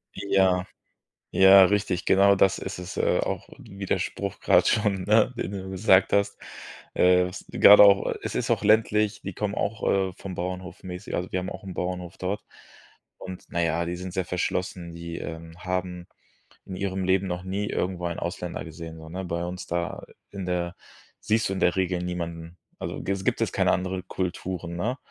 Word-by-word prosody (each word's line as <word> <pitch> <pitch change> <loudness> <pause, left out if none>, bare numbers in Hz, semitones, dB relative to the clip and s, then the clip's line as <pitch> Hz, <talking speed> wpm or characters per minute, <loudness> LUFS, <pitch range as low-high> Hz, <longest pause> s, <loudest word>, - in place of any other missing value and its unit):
Ja. 95 -2 +2 0.7
Ja, 95 0 +9
richtig, 100 -2 0
genau. 100 +1 +5
Das 95 0 +3
ist 95 -1 -6
es, 90 +1 -7
äh - - +2
auch - - -3
Widerspruch 100 0 -3
grad - - +4
schon, 100 -3 +1
ne? 105 +5 +3
Den 90 - -3
du 95 -1 -6
gesagt 95 0 +4
hast. 100 0 +1 0.6
Äh, 90 0 +5
was 90 - -8
gerade 105 0 +8
auch 100 -1 +6 0.2
es - - -4
ist - - -1
auch - - 0
ländlich, 105 0 +3
die 100 - -5
kommen 105 -1 -2
auch, 110 +2 -2
äh, 95 -1 +1
vom 95 -2 -7
Bauernhof, 90 +1 -5
mäßig. 90 0 -5
Also 90 - -4
wir 95 - 0
haben 90 - -5
auch - - -9
'n 95 -2 -7
Bauernhof 90 0 -4
dort 100 +3 -3 0.7
und, 95 -1 -8
na 85 - -2
ja, 85 +1 +1
die 85 +1 -3
sind 90 0 -7
sehr 95 -2 0
verschlossen. 90 -1 -3
Die, 85 0 -6
ähm, 80 0 -7
haben 90 -1 -3 0.6
in 95 - -7
ihrem 95 0 -2
Leben 95 +1 +2
noch 90 0 -4
nie 100 +2 -2
irgendwo 90 -1 -2
einen 85 - -4
Ausländer 90 0 -4
gesehen, 80 0 -9
so, 80 0 -11
ne, 95 +3 -5
bei 85 0 -2
uns 90 0 -6
da 85 0 -3 0.3
in 100 -2 -5
der 90 -1 -2 0.5
siehst 110 +1 +1
du - - -1
in 95 - -3
der 90 - +3
Regel 90 -1 0
niemanden. 85 -1 -5 0.2
Also, - - -5
g 95 - -2
es 95 -1 -5
gibt - - +1
es - - +1
keine - - +3
andere 95 0 -1
Kulturen, 90 -1 -4
ne? 120 +10 -2
95 Hz, 190 wpm, -26 LUFS, 90-100 Hz, 0.7 s, Ja